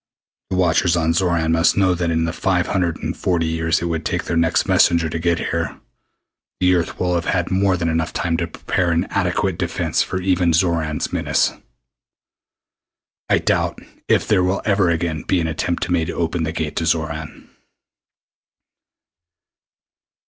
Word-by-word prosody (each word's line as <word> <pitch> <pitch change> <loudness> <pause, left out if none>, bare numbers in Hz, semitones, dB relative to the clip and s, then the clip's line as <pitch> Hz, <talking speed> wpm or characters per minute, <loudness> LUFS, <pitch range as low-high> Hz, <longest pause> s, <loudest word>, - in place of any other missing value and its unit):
The - - -2
watchers 90 -1 +2
on 80 -1 +1
Xoran 85 -2 +1
must 80 +3 +3
know 95 -2 +3
that 85 -1 -1
in 80 0 +1
the 85 - -3
five 90 -1 0
hundred 90 -4 -1
and - - -2
forty 85 -3 0
years 80 +1 0
it - - -1
would 85 -1 -2
take - - -2
their - - -3
next 85 0 +2
messenger 85 -2 +3
to 80 - -3
get 85 0 +1
here, 85 -4 -3 0.8
the 90 0 +3
Earth 85 -2 -1
will 90 -1 0
have 85 -1 -1
had 90 -1 -1
more 95 0 +2
than 85 -1 -1
enough 80 0 0
time 85 -2 -1
to 85 0 -2
prepare 85 +1 -1
an 85 +2 +1
adequate 90 -1 0
defense - - 0
for 90 - -2
even 90 -2 +1
Xoran's 80 -3 0
menace. - - +1 1.8
I - - +4
doubt - - 0 0.3
if - - +2
there 90 - +3
will 95 +2 0
ever 100 -3 +2
again 80 -2 -1
be 95 - 0
an 85 - -1
attempt 80 +2 -2
made 85 -3 0
to - - -4
open 85 0 -2
the 80 - -2
Gate 80 -2 -4
to 80 - 0
Xoran." 80 -1 -3
85 Hz, 170 wpm, -20 LUFS, 80-90 Hz, 1.8 s, I